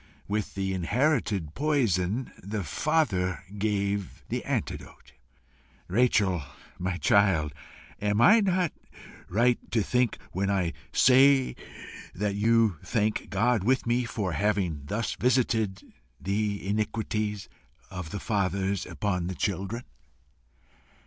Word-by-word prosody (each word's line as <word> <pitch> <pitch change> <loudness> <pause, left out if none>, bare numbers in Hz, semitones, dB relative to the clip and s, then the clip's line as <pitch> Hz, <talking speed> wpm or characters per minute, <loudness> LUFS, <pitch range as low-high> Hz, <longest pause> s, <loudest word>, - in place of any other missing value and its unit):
With 105 0 -2
the 95 -1 -1
inherited 100 - 0
poison, 120 - 0
the 100 +1 -4
Father 95 - 0
gave 100 -2 -2
the - - -2
antidote. - - -4 0.8
Rachel, 100 -4 +2 0.4
my 90 0 -2
child, 95 -8 +3 0.5
am 105 +1 +1
I 210 - +7
not 185 -4 +1 0.6
right 120 +6 +3 0.7
when 95 +2 -1
I 90 -4 0 0.2
say 130 +1 +5 0.6
that 105 +2 -1
you 110 -2 +3
thank 110 -2 -1
God 110 +1 +2
with 130 +4 +2
me 120 +1 +1
for 105 -5 -3
having 90 -6 0
THUS 110 +6 -2
visited 115 -6 0 0.3
the 100 0 -2
iniquities 105 0 -2 0.4
of 95 -4 -6
the 100 - -5
fathers 100 -2 -1
upon 90 -4 -2
the 95 - -4
children?" 100 +5 -2
105 Hz, 105 wpm, -27 LUFS, 95-115 Hz, 0.8 s, I